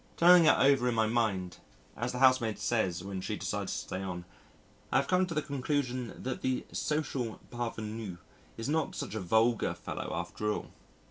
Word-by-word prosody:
Turning 175 0 +8
it - - +6
over 135 -3 +4
in 120 - 0
my 110 -1 +3
mind 110 -6 0 0.4
(as 120 +2 -2
the 125 - -4
housemaid 130 -4 +4
says 90 -7 0
when 95 -1 -4
she - - -3
decides - - -3
to - - -2
stay 95 - -4
on) 90 -2 -5 0.7
I - - -1
have 140 - +2
come 185 0 +3
to 165 - -5
the 150 - +1
conclusion 130 -3 -2
that 130 - -3
the 130 -1 -1
social 140 -6 -2
parvenu 110 -5 -4 0.4
is 115 - -4
not 155 +1 0
such - - -4
a 110 - -2
vulgar 110 +5 +2
fellow - - -5
after 105 0 -2
all. - - -4
120 Hz, 185 wpm, -31 LUFS, 105-135 Hz, 0.7 s, Turning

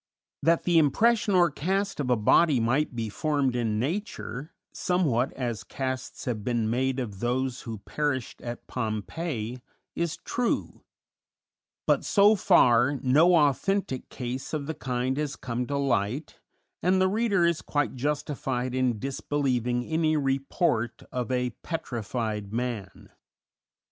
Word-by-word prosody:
That 165 0 +3
the 175 -2 +4
impression 210 - +3
or 175 -2 +5
cast 190 +7 -1
of 135 -3 -1
a 125 - +5
body 130 +6 +4
might 125 +4 +1
be 115 -2 -2
formed 140 +2 0
in 115 -3 0
nature, 155 - -3 0.2
somewhat 145 -9 +1
as 120 -4 -3
casts 130 -1 -4
have 115 -5 -2
been 115 -2 0
made 130 +2 0
of 105 -6 -5
those 125 +2 -1
who 110 - -4
perished 145 -5 -2
at 120 0 -6
Pompeii, 120 - -3 0.3
is 170 -2 -1
true; 245 -1 -2 1.0
but, - - +3
so 205 +1 +5
far, 140 - +4
no 155 +7 +5
authentic 150 0 +1
case 130 +3 -5
of 145 -2 -3
the 160 - -3
kind 130 -1 -2
has 150 -2 -2
come 125 0 -3
to 140 - -1
light, 130 0 -1 0.4
and 185 +2 +3
the 185 - +4
reader 200 -3 +2
is 170 -2 +1
quite 145 0 -1
justified 135 -2 -2
in 130 -3 +1
disbelieving 125 -1 -1
any 160 +1 +1
report 135 -3 0
of 125 -1 -3
"a 125 -1 0
petrified 110 -8 -3
man." 115 -4 -4
130 Hz, 135 wpm, -27 LUFS, 120-160 Hz, 1.0 s, or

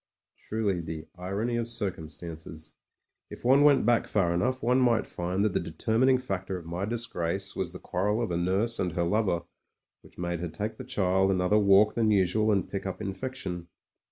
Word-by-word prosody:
Truly 105 -5 0
the 80 -1 -6
irony 100 +6 -2
of 115 -1 -1
circimistances! 80 -6 -5 0.6
If - - -10
one 135 +3 +6
went 145 -5 +5
back 120 0 +3
far 90 -5 +1
enough, 125 +9 0
one 125 +2 +3
might 120 -3 +3
find 90 +3 -2
that 105 - +1
the - - +2
determining 120 +9 +2
factor 95 -6 -4
of 85 - -10
my 85 +3 -3
disgrace 100 -4 -2
was 85 -3 -2
the 90 - -8
quarrel 100 +5 -1
of 115 -6 -1
a - - 0
nurse 95 +7 0
and 90 -3 -1
her 85 - 0
lover 90 -2 +1 0.6
which - - -20
made 85 -1 -2
her 85 0 -3
take 105 +6 -4
the 130 - -7
child 95 -6 +2
another 95 +2 +3
walk 100 +1 +5
than 115 -2 +2
usual 105 +2 +3
and 95 -4 +1
pick 100 0 -4
up 95 - -5
infection. 95 -3 -5
95 Hz, 185 wpm, -28 LUFS, 90-115 Hz, 0.6 s, one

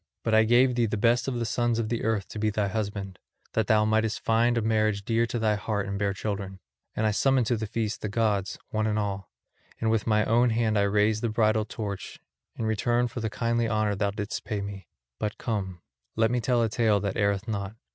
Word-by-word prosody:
But 115 - 0
I 110 0 +6
gave 125 +3 +4
thee 120 -1 +1
the 110 - -2
best 120 +4 +2
of 130 -2 -1
the 120 - -1
sons 120 +1 0
of 115 0 -1
earth 110 -3 -1
to 110 - -6
be 110 0 +1
thy 105 -1 0
husband, 100 -3 -4 0.3
that 110 -2 +1
thou 110 -2 +4
mightest 110 0 +1
find 115 +2 +2
a - - +2
marriage 110 -2 +1
dear 115 0 +1
to 120 - -3
thy 110 -2 +2
heart 105 -1 -2
and 100 0 -4
bear 100 -1 +1
children; 100 -1 -4 0.4
and 110 - 0
I 110 - +3
summoned 130 +3 +2
to 120 - +1
the 110 -1 -3
feast 110 +1 -3
the 105 - -3
gods, 105 -3 0
one 110 0 0
and 105 0 0
all. 100 -2 -3 0.5
And 110 -1 +1
with 110 -1 0
my 105 -1 +3
own 120 +2 +3
hand 110 -1 +1
I 100 - +3
raised 105 +1 +2
the 115 - 0
bridal 110 -1 +2
torch, 105 -2 -6 0.4
in 115 - -3
return 120 +3 +1
for 120 +1 -6
the 110 -1 -2
kindly 115 +1 0
honour 110 -1 +1
thou 100 0 0
didst 105 +1 -4
pay 105 - -3
me. 100 -4 -7 0.3
But 105 -1 -3
come, 95 -6 -3 0.3
let 115 0 +2
me 125 -1 0
tell 120 0 +2
a 115 - +1
tale 110 -2 +2
that 100 -2 -1
erreth 100 0 0
not. 100 -1 -3
110 Hz, 230 wpm, -27 LUFS, 105-115 Hz, 0.5 s, I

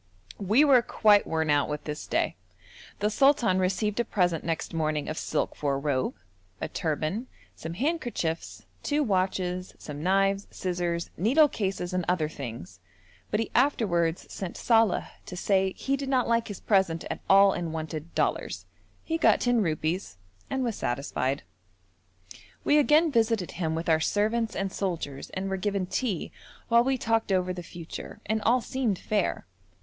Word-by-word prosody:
We 215 +10 +4
were 265 -4 +6
quite 210 -3 +4
worn 160 -1 0
out 145 0 +2
with 150 0 -4
this 150 0 -5
day. - - 0 0.7
The 210 +1 +2
sultan 240 -7 +4
received 195 +4 0
a - - +3
present 175 -7 0
next 165 0 -3
morning 155 -2 -1
of 155 - -3
silk 155 - -2
for 140 -2 -1
a - - -1
robe, 140 -2 -1 0.4
a - - -2
turban, 160 - -2 0.3
some 165 +1 -7
handkerchiefs, 240 - -2 0.2
two 295 0 +1
watches, 185 -3 -1
some 150 -1 -8
knives, 195 +3 +2
scissors, 175 -2 -2
needle 265 - +5
cases, 195 -8 -3
and 185 -1 0
other 175 -4 +1
things, 115 - -8 0.5
but 210 - 0
he 225 - -2
afterwards 185 - +2
sent 190 -3 -5
Saleh 225 -4 +3 0.2
to 180 - -7
say 190 0 +2
he 275 - -1
did 275 -1 -4
not 255 -2 +2
like 230 0 +1
his 205 -4 -7
present 190 -5 +2
at - - -4
all 195 0 +7
and 170 -2 -3
wanted 160 0 -6
dollars. - - -1 0.4
He 325 0 -2
got - - +5
ten 245 -2 +2
rupees 160 - -2 0.3
and 265 -1 -1
was 235 -4 -2
satisfied. 135 +1 -2 1.2
We 295 - +4
again 300 +2 +4
visited 225 -6 +1
him 160 -3 -2
with 165 +1 -4
our 160 -1 +4
servants 220 +6 0
and 195 -1 -2
soldiers 165 -8 -3
and 190 +1 -2
were 195 0 -1
given 195 0 -1
tea 200 -2 -2 0.4
while 235 0 +6
we 265 +1 +1
talked 225 -3 0
over 185 -1 +1
the 180 - -6
future, 170 -1 -9
and 220 +1 0
all 245 +3 +3
seemed 235 -6 -1
fair. 205 0 -1
190 Hz, 165 wpm, -27 LUFS, 165-225 Hz, 1.2 s, all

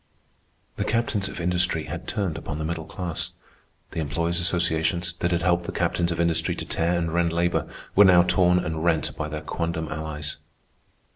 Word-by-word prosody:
The - - 0
captains 110 -4 0
of - - -7
industry 90 -2 +2
had - - -7
turned 95 -7 -1
upon 75 - -5
the 80 - -3
middle 80 0 -3
class. 90 -4 -4 0.6
The - - -4
employers' 85 +3 0
associations, 85 -1 +1
that 85 - +1
had 85 -1 0
helped 85 0 +2
the - - -3
captains 85 0 0
of 85 - -3
industry 85 -1 +2
to - - -5
tear 85 +2 0
and 85 -1 -1
rend 85 -1 +2
labor, 85 +1 0 0.3
were 105 - +9
now 90 -2 +7
torn 90 0 +4
and 80 -3 -2
rent 85 -2 +1
by 75 - -3
their 75 0 -5
quondam 80 0 -3
allies. 75 -1 -4
85 Hz, 185 wpm, -25 LUFS, 80-90 Hz, 0.6 s, were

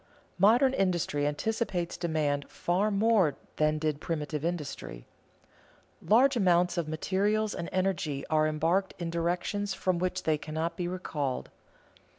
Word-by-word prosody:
Modern 240 +7 +5
industry 175 - 0
anticipates 180 +2 -2
demand 155 -4 -1
far 185 +5 0
more 200 -7 +3 0.2
than 155 0 +2
did 155 -1 -2
primitive 150 -2 -3
industry. 150 - -4 1.0
Large 255 +6 +4
amounts 180 -4 +3
of 170 -3 -1
materials 200 +7 0
and 170 - -5
energy 180 -7 -1
are 155 -1 +2
embarked 165 +5 0
in 170 -2 -4
directions 180 +4 -1
from 185 -2 0
which 185 +1 -2
they 155 -2 +1
cannot 160 +3 -3
be 175 0 -3
recalled. 150 -7 -3
175 Hz, 130 wpm, -29 LUFS, 155-195 Hz, 1.0 s, Modern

